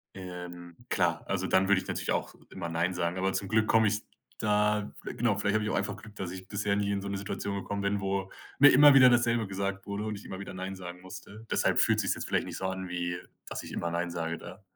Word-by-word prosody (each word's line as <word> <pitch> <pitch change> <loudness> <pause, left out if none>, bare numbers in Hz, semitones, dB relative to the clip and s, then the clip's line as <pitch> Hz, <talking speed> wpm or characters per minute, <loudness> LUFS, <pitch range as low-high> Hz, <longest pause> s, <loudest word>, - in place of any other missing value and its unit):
ähm, 90 -2 -8
klar, - - +1
also, - - -1
dann 95 0 +3
würde 100 -2 +4
ich - - -12
natürlich - - -2
auch - - -1 0.2
immer 85 -3 -5
nein 85 +2 0
sagen. 90 0 -1
Aber 95 +1 0
zum 100 - -2
Glück 110 +2 +3
komme 110 -1 +5
ich 105 +1 0 0.4
da 105 -1 +2
genau, 115 -3 0
vielleicht 100 +1 +1
habe 110 - +2
ich 105 - -1
auch - - 0
einfach 100 +1 -1
Glück, 110 0 -13
dass 95 -3 -4
ich 95 0 -8
bisher 100 0 0
nie 100 0 0
in 100 -1 -1
so 100 - -5
'ne 100 0 -2
Situation 100 0 -4
gekommen 100 +1 -3
bin, 100 0 0
wo 95 0 -2 0.3
mir 145 0 +9
immer 145 +2 +9
wieder 130 -2 +9
dasselbe 120 -2 +2
gesagt 100 0 -3
wurde 100 +1 -3
und 110 -1 -3
ich - - -14
immer 95 - -6
wieder 100 - -7
nein 95 +1 -5
sagen 90 -1 -8
musste. 95 +4 -10
Deshalb - - +2
fühlt - - +4
sich - - -2
es - - +2
jetzt - - -5
vielleicht - - +1
nicht - - -6
so 95 - -4
an, 95 -1 -3
wie, 90 0 -2 0.3
dass - - -5
ich - - -9
immer 85 - -2
nein 85 +1 -1
sage 85 -1 -3
da. 90 +5 -11
100 Hz, 260 wpm, -29 LUFS, 90-105 Hz, 0.4 s, mir